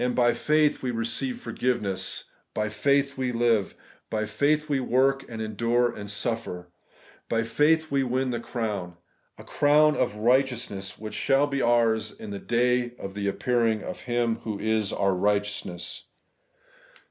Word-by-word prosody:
By 120 -1 +4
faith 150 -1 +2
we 130 - -2
receive 120 - -2
forgiveness; 105 - -2 0.3
by 105 0 0
faith 140 +5 +1
we 130 -1 0
live: 115 -4 +1 0.3
by 110 -1 -1
faith 145 +8 +1
we 145 -3 +1
work, 135 +2 +2
and 115 -2 -6
endure, 115 +3 +1
and 105 -1 -8
suffer; 105 -4 -3 0.6
by 115 -1 +1
faith 155 +7 +2
we 140 -1 +2
win 130 0 0
the 120 - -2
crown, 105 -8 -4 0.2
— - - -44
a - - -11
crown 150 +1 +4
of 105 - 0
righteousness, 120 -4 0
which 110 0 -7
shall 135 +1 +3
be 140 -2 -2
ours 115 -2 +3
in 105 - -7
the 100 - -5
day 120 +1 +1
of 95 -4 -7
the 100 0 -3
appearing 115 0 +1
of - - -6
Him 120 -2 0
who 110 -3 -5
is 110 -1 0
QUE 100 - -1
RIGHTEOUSNESS. 100 -2 -1
120 Hz, 155 wpm, -26 LUFS, 105-130 Hz, 0.6 s, By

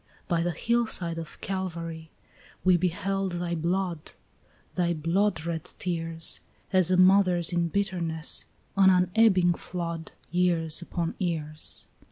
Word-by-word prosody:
By 170 -3 +1
the 175 - 0
hillside 185 -3 0
of 165 - -9
Calvary 165 -4 -4 0.5
we 185 -1 +5
beheld 185 +2 -1
thy 175 0 -2
blood, 170 0 -2 0.6
Thy 175 -2 +1
bloodred 165 0 -1
tears, 165 -2 -1 0.3
As 185 -2 +4
a 185 - +3
mother's 185 -2 +5
in 170 -1 +2
bitterness, 170 -4 -1 0.3
an 195 -1 +6
unebbing 185 0 +4
flood, 170 -2 -5 0.2
Years 175 -2 +2
upon 170 -1 -3
years. 155 -4 -3
175 Hz, 115 wpm, -27 LUFS, 165-185 Hz, 0.6 s, an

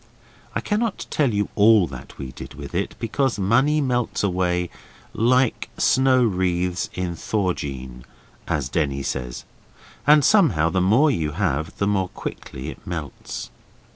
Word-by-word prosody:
I - - 0
cannot 215 0 -1
tell 140 -5 +2
you 105 -1 0
all 105 -2 +6
that 65 -5 -10
we 65 -2 -6
did - - -10
with 70 +1 -9
it, 95 +3 -2
because 120 +2 0
money 130 +10 +3
melts 125 -5 0
away 90 -2 0 0.4
'like 125 +2 +2
snow 130 -1 +4
wreaths 90 -4 0
in 90 -1 -2
thaw 95 +1 0
jean', 65 -4 -7 0.4
as 70 -4 -1
Denny 70 -2 -1
says, 60 -3 -4 0.6
and 150 -1 +7
somehow 115 - +4
the 95 - +1
more 120 +11 +4
you 80 - -1
have 80 -4 -1
the 100 - +1
more 95 -3 +1
quickly 65 - -7
it - - -11
melts. - - -6
95 Hz, 145 wpm, -23 LUFS, 80-125 Hz, 0.6 s, and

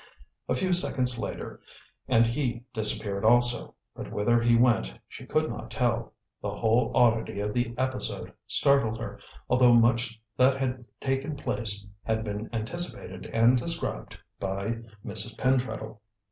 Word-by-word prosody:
A 125 - +2
few 185 +7 0
seconds 125 -8 +1
later - - -6 0.5
and 115 +1 +4
he 120 -1 -2
disappeared 105 -3 +2
also, 120 +1 +3 0.2
but - - -8
whither 120 +3 +2
he 115 0 +4
went 115 - +3 0.2
she - - -11
could - - +1
not - - -6
tell. - - -1 0.3
The - - -3
whole 115 +2 +1
oddity 115 -4 +2
of 105 +1 -2
the 120 -1 -1
episode 130 0 -2
startled 140 -6 +3
her, - - -7 0.3
although 125 -1 +5
much 115 -1 +2 0.2
that 130 +1 +4
had 130 -2 -3
taken 135 +2 -2
place 105 -7 -1 0.2
had 110 0 -1
been 105 0 -5
anticipated 115 - -4
and 115 +2 +4
described 165 +6 -3 0.2
by 100 +4 -2 0.3
Mrs. 110 +1 +2
Pentreddle. 125 -4 -1
120 Hz, 140 wpm, -27 LUFS, 110-125 Hz, 0.5 s, although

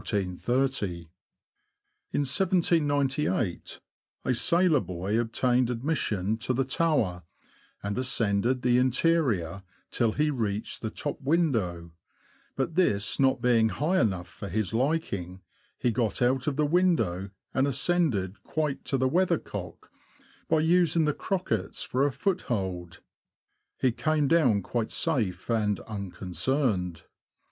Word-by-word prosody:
In 95 -4 -1 1.9
1798, 145 - +1 0.5
a 130 - +2
sailor 170 +4 +4
boy 95 +2 -2
obtained 120 +2 +1
admission 115 - -1
to 125 +3 -1
the 135 +1 +1
tower, 130 - 0 0.6
and 100 0 -2
ascended 120 0 +1
the 125 0 +4
interior 125 - +1 0.3
till 115 -2 +1
he 150 0 +1
reached 110 -5 -3
the 110 - -2
top 145 +6 -5
window, 115 - 0 0.6
but 135 +5 -2
this 110 - +1
not 135 -1 +2
being 115 -2 +4
high 165 +10 0
enough 95 -5 0
for 100 +3 -8
his 105 +1 -2
liking, 105 - -1 0.3
he 120 - +1
got 115 -1 -1
out 130 +2 +1
of 145 - 0
the 150 +1 +2
window, 145 - +1 0.2
and 135 +1 +2
ascended 135 - 0
quite 150 -3 -2
to 135 - 0
the 130 0 +2
weathercock, 145 - -2 0.6
by 160 -1 +3
using 165 -1 +3
the 150 - +1
crockets 115 - -2
for 135 +3 +1
a - - -2
foot 180 +7 -1
hold. 90 -6 -3 0.8
He 130 - +3
came 155 +3 0
down 130 - +3
quite 115 +1 -2
safe 110 - -1
and 105 -3 +1
unconcerned. 95 - -2
125 Hz, 120 wpm, -27 LUFS, 100-150 Hz, 1.9 s, sailor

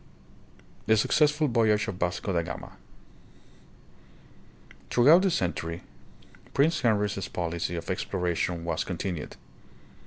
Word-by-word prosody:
The 110 - +5
Succ 150 +8 +4
ssful 150 -2 0
Voyage 110 -3 +2
of 90 - -5
Vasco 90 +2 -1
da 85 - +2
Gama. - - -8 2.1
Through 125 +5 +5
out 175 +3 +8
the 195 - +2
century 85 - -2 0.7
Prince 155 +3 +3
Henry's 105 -4 0
policy 85 0 -3
of 85 - -6
exploration 90 -2 -2
was 85 -2 -1
continued. 90 -2 -5
95 Hz, 115 wpm, -27 LUFS, 85-120 Hz, 2.1 s, out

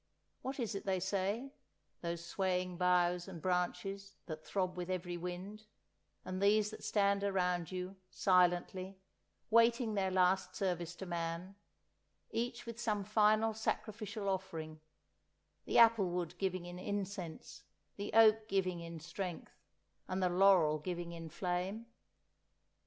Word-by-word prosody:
What 265 +1 -4
is 230 -3 -1
it 200 - -4
they 190 -1 +2
say, 200 +8 -1 0.5
those 170 0 -4
swaying 180 0 -1
boughs 180 0 +2
and 180 -3 -7
branches 185 +3 -2
that 155 -2 -6
throb 185 +1 -1
with 180 0 -4
every 180 -1 -2
wind, 180 +5 -6 0.6
and 185 +1 -4
these 210 +1 +4
that - - -10
stand 200 -1 +2
around 180 -3 0
you, 185 +1 -4
silently, 185 +1 +2 0.5
waiting 230 0 +4
their 195 -2 +1
last 185 0 +2
service 175 -3 -2
to 190 - -7
man, 170 +1 -3 0.8
each 240 +1 -2
with 230 0 -7
some 210 -4 0
final 215 +2 +3
sacrificial 215 -1 -3
offering—the 160 -5 -6
apple 225 -5 +6
wood 175 -1 -2
giving 185 -2 -1
in 175 0 -7
incense, 195 -4 -5 0.3
the 200 0 -4
oak 220 0 +6
giving 185 -3 0
in 170 -1 -7
strength, 170 +2 -6 0.5
and 185 0 -1
the 180 - +3
laurel 175 -4 +5
giving 175 +2 -4
in 165 -1 -7
flame? 185 +6 -2
185 Hz, 130 wpm, -35 LUFS, 175-205 Hz, 0.8 s, apple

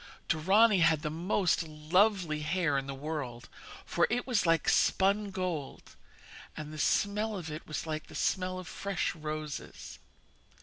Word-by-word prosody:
Dorani 195 +6 +4
had 160 -3 +3
the 150 - -2
most 175 +2 +1
lovely 165 +2 +1
hair 165 -1 0
in 135 0 -1
the 135 - -4
world, 135 -5 -5 0.4
for - - +2
it 245 +2 -1
was 240 -9 +1
like 165 -1 +2
spun 200 +2 +3
gold, 180 -7 -5 0.6
and 155 0 -6
the 155 - -7
smell 210 +5 +1
of 165 -4 -6
it 155 +2 -7
was 155 0 -4
like 155 -1 -4
the - - -12
smell 185 -1 0
of 185 -2 -7
fresh 200 +1 -2
roses. 155 -2 -6
165 Hz, 150 wpm, -31 LUFS, 155-195 Hz, 0.6 s, Dorani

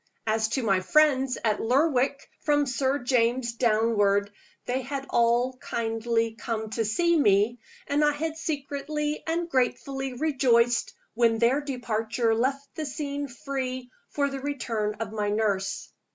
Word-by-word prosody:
As 220 0 +1
to 265 - -1
my 195 -4 +3
friends 270 +3 +3
at 215 -2 +1
Lerwick, 275 +2 +1
from 290 -1 +2
Sir 265 +1 0
James 245 -2 +1
downward, 215 -3 +2 0.3
they 255 +2 -1
had 275 +2 -5
all 240 +2 +2
kindly 230 -1 -1
come 220 -1 -4
to 225 - 0
see 340 +11 +2
me 215 -3 +3 0.3
and 290 +1 +1
I 295 - +4
had 315 +2 -3
secretly 300 0 -3
and 330 +1 0
ungratefully 270 -3 -1
rejoiced 245 -4 +2 0.2
when 230 -1 +3
their 240 +5 +3
departure 230 -4 -1
left 270 +4 -1
the 310 -2 -4
scene 285 0 -4
free 255 -1 -5 0.2
for 285 -1 0
the 275 -1 -4
return 235 -7 -2
of 220 -1 -5
my 210 -1 -1
nurse. 205 -2 -1
250 Hz, 140 wpm, -26 LUFS, 225-280 Hz, 0.3 s, I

